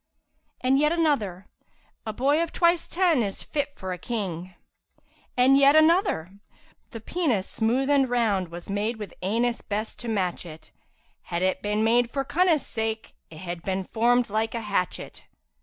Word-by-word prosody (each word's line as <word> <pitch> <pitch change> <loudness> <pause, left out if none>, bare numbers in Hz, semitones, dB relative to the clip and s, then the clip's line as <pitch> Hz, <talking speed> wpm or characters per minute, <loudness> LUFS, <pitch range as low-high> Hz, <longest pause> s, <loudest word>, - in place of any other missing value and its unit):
And 265 +2 +3
yet 300 +1 +3
another, 240 - 0 0.6
'A 220 - -2
boy 280 +7 +2
of 335 - -2
twice 340 -1 +2
ten 345 -7 +2
is 200 -3 -3
fit 290 -1 -3
for 185 -1 -4
a 180 - -7
King!' 185 -5 -4 0.8
And 265 +2 +5
yet 280 +1 +6
another, 315 - +3 0.5
'The 225 - -8
penis 250 - -1
smooth 240 +4 0
and 280 -2 +3
round 215 -7 +1
was 170 +1 -9
made 210 +3 -2
with 210 -4 -8
anus 230 +5 0
best 215 +2 -4
to 240 - -7
match 190 -6 -1
it, 155 -2 -12 0.3
* - - -40
Had 170 +1 -1
it 185 0 0
been 210 +1 0
made 235 +1 +3
for 275 +2 -2
cunnus' 330 -1 +2
sake 220 -1 -4 0.2
it 155 -1 -11
had 175 -2 -5
been 190 +1 -2
formed 235 +3 +1
like 220 +2 -1
hatchet!' 205 -5 -3
225 Hz, 165 wpm, -25 LUFS, 195-275 Hz, 0.8 s, yet